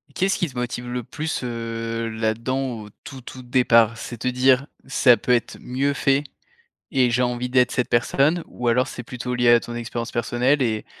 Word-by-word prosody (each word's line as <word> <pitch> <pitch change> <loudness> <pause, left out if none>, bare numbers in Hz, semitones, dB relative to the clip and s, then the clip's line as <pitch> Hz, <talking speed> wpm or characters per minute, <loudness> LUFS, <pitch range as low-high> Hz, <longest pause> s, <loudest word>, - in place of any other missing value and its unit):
Qu'est-ce 190 +1 +1
qui 175 - 0
te 130 -3 -11
motive 125 0 -3
le 125 -1 -3
plus, 150 +1 -4
heu, 115 -1 -3
là-dedans 115 +4 -2
au 105 - -11
tout, 130 -1 -9
tout 130 +1 -10
départ? 115 -3 +3
C'est 120 +1 -7
te 125 - -3
dire: 130 +2 +3 0.2
«Ça 130 -2 +5
peut 125 - -2
être 120 -1 +1
mieux 135 +3 -1
fait 140 +1 +2 0.7
et 130 -2 +3
j'ai 125 +2 +1
envie 125 0 -2
d'être 125 -1 +3
cette 125 - -1
personne?» 140 +7 +2
ou 125 - -5
alors 125 +2 +2
c'est - - -7
plutôt 125 +1 -5
lié 120 -1 +3
à 120 0 +7
ton 120 0 -8
expérience 120 0 -4
personnelle 125 +4 +1
et 110 -3 0
125 Hz, 195 wpm, -23 LUFS, 115-130 Hz, 0.7 s, à